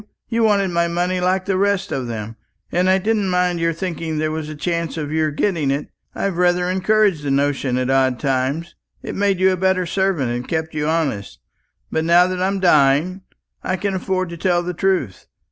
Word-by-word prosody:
You 230 0 0
wanted 205 -3 +3
my 170 0 +1
money 175 +2 -1
like 185 +1 +1
the 190 -2 0
rest 200 -1 +1
of 130 -2 -2
them, 110 -1 -5 0.4
and 180 +2 +2
I 190 - +5
didn't 210 0 0
mind 180 -1 +1
your 165 0 +1
thinking 165 -2 -4
there 155 0 0
was 155 -1 -4
a 155 - -6
chance 170 +1 -2
of 150 -2 -4
your 155 0 +1
getting 155 -1 0
it. 140 +2 -2 0.3
I've 195 -3 -2
rather 180 0 +2
encouraged 190 -2 +2
the 145 - -3
notion 140 -2 0
at 130 +1 0
odd 130 -2 +2
times. 140 +5 -1 0.3
It - - -5
made 200 -2 +1
you 190 0 +4
a 185 - -1
better 190 0 +1
servant, 175 -8 0
and 120 +1 -4
kept 160 -1 -2
you 150 -1 -1
honest. 150 -11 -1 0.5
But 160 - 0
now 170 +2 +5
that 185 0 -3
I'm 195 +1 0
dying, 160 +2 +3 0.4
I 185 - 0
can 200 +1 -2
afford 185 -1 -1
to 170 - -7
tell 175 0 +1
the 180 +1 -3
truth. 175 - -1
175 Hz, 205 wpm, -20 LUFS, 150-185 Hz, 0.5 s, I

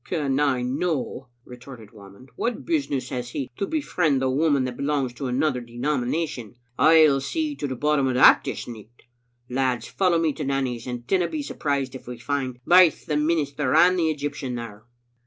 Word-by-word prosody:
f - - -22
"Can 145 -6 0
I 135 -4 +1
no?" 135 0 -2 0.2
retorted 125 -3 -12
Whamond. 100 +4 -15
"What 235 -1 -3
business 145 - -1
has 125 -1 -4
he 130 +1 -5
to 200 - -2
befriend 160 - 0
a 130 - +1
woman 145 -1 +2
that 125 -1 -4
belongs 140 -2 -1
to 135 +2 -5
another 125 +1 0
denomination? 125 +1 -3 0.2
Pll 155 -4 +6
see 310 - -2
to 145 - -3
the 130 - -4
bottom 145 +1 +1
o' 130 - 0
that 125 - +6
this - - -5
nicht. 115 0 -12 0.4
Lads, 125 -2 -1
follow 180 -3 +1
me 165 -2 +1
to - - -5
Nanny's, 130 -3 -2
and 120 -1 -5
dinna 180 +1 +1
be 310 -2 -4
surprised 140 - -2
if 130 - -10
we 125 -1 -7
find 130 0 -3
baith 180 -2 +5
the 150 - -2
minister 150 -3 0
and 180 +3 +5
the 160 -2 +2
Egyptian 145 -4 -4
tljere." 110 -3 -8
135 Hz, 185 wpm, -24 LUFS, 125-155 Hz, 0.4 s, Pll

